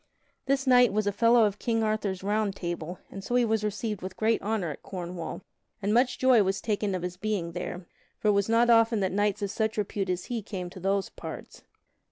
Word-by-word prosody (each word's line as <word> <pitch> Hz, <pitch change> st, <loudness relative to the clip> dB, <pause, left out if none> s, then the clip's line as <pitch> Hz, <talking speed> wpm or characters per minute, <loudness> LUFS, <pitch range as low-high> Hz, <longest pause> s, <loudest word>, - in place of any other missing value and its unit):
This 270 Hz, 0 st, +1 dB
knight 250 Hz, -2 st, +6 dB
was 215 Hz, +1 st, 0 dB
a 205 Hz, -, +2 dB
fellow 230 Hz, +2 st, +5 dB
of 205 Hz, -1 st, -2 dB
King 225 Hz, -1 st, 0 dB
Arthur's 210 Hz, -3 st, -1 dB
Round 205 Hz, 0 st, 0 dB
Table, 175 Hz, -1 st, -4 dB
and 195 Hz, -, -7 dB
so 245 Hz, -, -2 dB
he 245 Hz, -1 st, +4 dB
was 220 Hz, -1 st, 0 dB
received 210 Hz, 0 st, -3 dB
with 185 Hz, 0 st, -7 dB
great 220 Hz, +1 st, +2 dB
honor 205 Hz, -6 st, -1 dB
at 145 Hz, -, -9 dB
Cornwall, 180 Hz, -1 st, -6 dB, 0.4 s
and 205 Hz, +1 st, 0 dB
much 245 Hz, +2 st, +3 dB
joy 255 Hz, -4 st, +5 dB
was 195 Hz, 0 st, 0 dB
taken 205 Hz, -2 st, -1 dB
of 180 Hz, -, -4 dB
his 180 Hz, 0 st, -4 dB
being 200 Hz, -4 st, -2 dB
there; 175 Hz, +1 st, -5 dB, 0.3 s
for 215 Hz, -, +1 dB
it -, -, +6 dB
was 200 Hz, +1 st, +1 dB
not 235 Hz, +1 st, +4 dB
often 230 Hz, -1 st, +4 dB
that 190 Hz, -, 0 dB
knights 205 Hz, +1 st, 0 dB
of 200 Hz, -, -2 dB
such 220 Hz, 0 st, -1 dB
repute 200 Hz, -2 st, -2 dB
as 180 Hz, -1 st, -2 dB
he 240 Hz, -2 st, -3 dB
came 185 Hz, -4 st, -6 dB
to 185 Hz, -, -10 dB
those 195 Hz, +1 st, 0 dB
parts. -, -, -9 dB
205 Hz, 225 wpm, -28 LUFS, 190-225 Hz, 0.4 s, knight